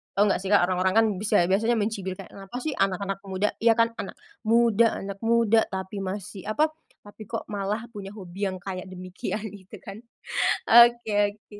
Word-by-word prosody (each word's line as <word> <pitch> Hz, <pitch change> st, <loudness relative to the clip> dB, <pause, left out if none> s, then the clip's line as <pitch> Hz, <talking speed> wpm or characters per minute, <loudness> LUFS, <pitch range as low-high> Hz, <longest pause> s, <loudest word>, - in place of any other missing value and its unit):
tau 200 Hz, -, +4 dB
nggak 195 Hz, -, +1 dB
sih 195 Hz, -, -4 dB
orang-orang 185 Hz, -1 st, +3 dB
kan 225 Hz, 0 st, +6 dB
bisa 205 Hz, -3 st, +3 dB
biasanya 225 Hz, +5 st, +2 dB
mencibir 205 Hz, -3 st, -2 dB
kayak, -, -, -11 dB
"Kenapa 195 Hz, +3 st, -11 dB
sih 310 Hz, -, -1 dB
anak-anak 195 Hz, +1 st, -1 dB
muda, 190 Hz, +2 st, 0 dB
ya 230 Hz, 0 st, +5 dB
kan 230 Hz, 0 st, +3 dB
anak -, -, -5 dB, 0.3 s
muda 230 Hz, 0 st, +3 dB
anak 195 Hz, 0 st, -6 dB
muda 225 Hz, -1 st, +4 dB
tapi 190 Hz, +1 st, -5 dB
masih 195 Hz, 0 st, -6 dB
apa, 305 Hz, +9 st, +1 dB, 0.3 s
tapi 205 Hz, +1 st, -11 dB
kok 225 Hz, -, -4 dB
malah 205 Hz, +2 st, -3 dB
punya 200 Hz, -3 st, -8 dB
hobi 195 Hz, 0 st, -4 dB
yang 185 Hz, -1 st, -4 dB
kayak 185 Hz, -2 st, -5 dB
demikian," 185 Hz, +4 st, -5 dB
gitu 200 Hz, +1 st, -12 dB
kan. 195 Hz, +2 st, -9 dB, 0.7 s
Oke 225 Hz, -3 st, +5 dB
oke. 210 Hz, -1 st, -16 dB
205 Hz, 175 wpm, -26 LUFS, 190-225 Hz, 0.7 s, kan